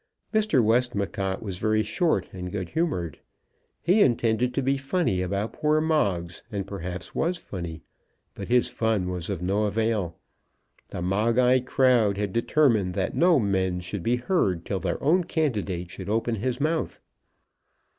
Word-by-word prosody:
Mr. 215 - +3
Westmacott 100 -4 0
was 95 -4 -4
very 110 0 +2
short 170 - 0
and 90 -1 -6
good 95 -3 -4
humoured. 120 - -2 0.6
He 190 +6 +4
intended 120 - +2
to 135 - 0
be 135 +2 +2
funny 135 - 0
about 100 +4 -2
poor 150 0 +2
Moggs; 100 - 0
and 100 -3 -3
perhaps 90 -2 -6
was 170 +2 0
funny. 85 - -7 0.5
But - - -7
his 125 0 +3
fun 110 -5 0
was 90 0 -4
of 95 -4 -3
no 100 +4 +1
avail. 105 -4 -1 0.7
The 90 - -5
Moggite 120 +7 +2
crowd 120 -8 +3
had 100 -2 -2
determined 115 -7 +2
that 95 - -1
no 175 -1 +5
men 95 -5 0
should 90 +2 -5
be 115 +8 +1
heard 120 - 0
till 95 - -2
their 90 -2 -2
own 175 +6 +4
candidate 105 - -2
should 95 0 -7
open 115 +2 0
his 120 +4 -2
mouth. 155 +2 -1
110 Hz, 155 wpm, -26 LUFS, 95-130 Hz, 0.7 s, no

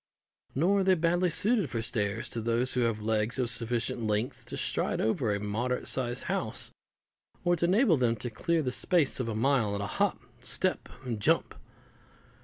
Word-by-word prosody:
Nor 185 +9 +3
are - - +2
they 190 0 +4
badly 175 +2 +2
suited 200 - +2
for 120 - -2
stairs 105 -1 -2
to 115 - -4
those 120 +3 +1
who 125 - 0
have 115 -3 +1
legs 110 +2 0
of 125 -3 +1
sufficient 120 +1 -1
length 105 +3 -2
to - - -6
stride - - 0
over 110 0 +1
a 100 - 0
moderate 115 +5 -2
sized 125 -1 -1
house, - - -2 0.7
or 175 0 +3
to 170 - +1
enable 190 - +4
them 120 -3 +2
to 120 +2 -5
clear 165 +7 0
the 125 - -1
space 160 0 +1
of 120 -3 -1
a 110 - -3
mile 115 -3 +2
in 100 - -3
a - - -2
hop, 200 - 0 0.2
step, 185 +8 0 0.2
and 115 -4 -3
jump. 100 - +2
125 Hz, 190 wpm, -29 LUFS, 110-170 Hz, 0.7 s, they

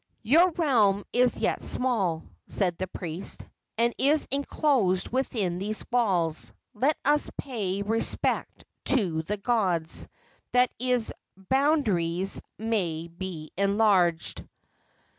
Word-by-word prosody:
"Your 325 +11 +5
realm 220 - +3
is 245 0 +3
yet - - 0
small," 195 -11 0 0.2
said 180 -4 +1
the 185 - -2
priest, 175 0 -5 0.3
"and 235 +1 +2
is 290 +3 +3
enclosed 270 - +1
within 215 -9 -1
these 210 +3 -4
walls. 180 -10 +1 0.2
Let 270 +7 +1
us 295 +1 +3
pay 200 -7 -3
respect 225 +2 0 0.2
to 185 -12 +2
the 205 +6 -3
gods, 195 -7 0 0.5
that 250 0 +4
its 250 -2 +1 0.3
boundaries 195 - +1 0.2
may 175 -8 -2
be 170 -3 -7
enlarged." 200 -4 +2
210 Hz, 105 wpm, -27 LUFS, 180-250 Hz, 0.5 s, Your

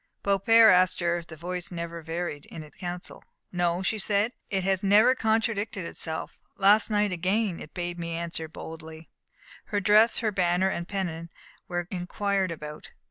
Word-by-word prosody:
Beaupère 220 +3 +6
asked 185 0 +3
her 175 -1 +1
if 170 -1 -8
the 160 - -9
voice 175 +2 -5
never 170 -1 -5
varied 165 -2 -5
in 160 - -8
its 150 -2 -16
counsel. 175 0 -6 0.3
"No," 175 0 0
she 215 +3 -1
said; 205 +4 +1 0.2
"it 190 -2 -1
has 190 0 +1
never 210 +6 +6
contradicted 220 -4 0
itself. 160 -1 -4 0.2
Last 205 +3 +5
night 210 -1 +1
again 185 +2 0
it 150 - -11
bade 175 -1 -4
me 170 -1 -4
answer 165 -1 -3
boldly." 160 0 -10 0.5
Her 205 - -1
dress, 210 +3 +5
her 220 -2 0
banner 185 -1 +2
and 170 -2 -4
pennon, 170 -4 -4 0.4
were 175 -1 -3
inquired 195 +1 -1
about. 150 -2 -8
180 Hz, 165 wpm, -27 LUFS, 170-205 Hz, 0.5 s, Beaupère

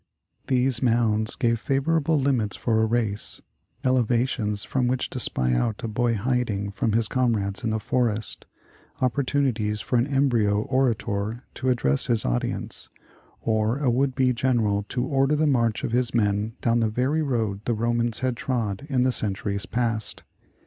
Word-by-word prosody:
These 130 -1 +2
mounds 115 -3 +2
gave 115 -2 +1
favorable 150 +4 +1
limits 125 -7 +1
for 110 -2 +1
a 110 - +2
race, 110 -3 -1 0.4
ele 130 -1 +3
vations 115 -3 0
from 130 -2 0
which 125 +1 -1
to 130 - -4
spy 65 - +2
out - - -1
a - - -1
boy 115 +2 0
hiding 110 -3 -1
from 105 +2 -1
his 115 0 +2
comrades 110 -6 0
in 115 - 0
the 110 0 -1
forest, 115 -1 -1 0.5
opportunities 125 -5 0
for 125 - 0
an 120 +3 +2
embryo 120 -7 +2
orator 115 -3 -1
to 130 - -2
address 70 - +1
his 115 -3 +1
audience, - - -2 0.5
or 110 +2 +1
a 140 -4 +1
would 130 +2 +1
be 130 -2 +2
general 115 -5 0
to 125 0 -1
order 135 +2 +2
the 155 +1 +2
march 120 -6 +1
of - - -2
liis 125 0 +1
men 105 0 +1
down 115 0 +2
the 110 -1 +1
very 130 +8 0
road 115 -9 -1
the 120 - 0
Romans 115 +1 0
had 130 -1 0
trod 120 -1 -3
in 130 -3 +2
the 130 - +2
centuries 100 -3 -1
past. 115 -2 -2
120 Hz, 165 wpm, -25 LUFS, 110-130 Hz, 0.5 s, ele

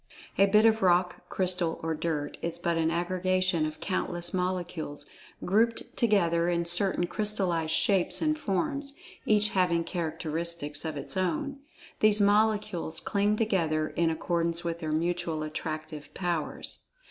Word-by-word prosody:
A 195 - +7
bit 210 +2 +5
of 225 0 +4
rock; 180 -1 +2
crystal; 180 -3 0
or 160 0 0
dirt; 155 -2 -2
is 170 0 -1
but 170 0 0
an 160 -1 +1
aggregation 185 -1 +1
of 155 0 -8
countless 175 -2 -3
Molecules, 175 -5 -3 0.4
grouped 225 +5 +1
together 175 -7 +2
in 170 -1 0
certain 175 +1 +1
crystallized 180 -4 0
shapes 195 -4 +3
and 310 -1 +1
forms, 280 - -2 0.3
each 210 0 +4
having 180 -4 +2
characteristics 165 -2 -3
of 160 -1 -3
its[Pg 140 - -4
56] - - -2
own. 280 +9 -1 0.4
These 215 0 +5
Molecules 205 -5 +2
cling 205 0 +1
together, 165 -8 +1
in 170 -1 +1
accordance 170 +1 -1
with 170 -1 -3
their 155 -2 -3
mutual 165 0 -1
Attractive 155 0 -5
powers. 175 -4 -3
175 Hz, 140 wpm, -28 LUFS, 165-200 Hz, 0.4 s, A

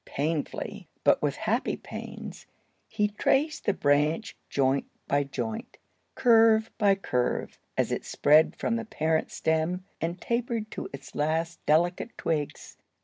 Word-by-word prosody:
Painfully, 150 +2 -3 0.2
but - - +4
with - - 0
happy - - -1
pains, - - -8 0.4
he 210 -1 +1
traced 285 +8 +1
the 205 - +3
branch 150 +9 +1
joint 135 0 +1 0.2
by 145 0 +2
joint, 225 - -5 0.4
curve 225 -2 +5
by 200 -2 +5
curve, 125 -10 -2 0.2
as - - +1
it - - -1
spread 155 +2 +4
from 230 - -1
the 230 - -4
parent 160 -6 0
stem 160 +3 0 0.2
and 170 +3 -2
tapered 235 -2 -2
to - - -5
its 140 0 -10
last 160 +3 -1
delicate 175 +8 +2
twigs. 150 -3 -3
170 Hz, 135 wpm, -28 LUFS, 150-220 Hz, 0.4 s, curve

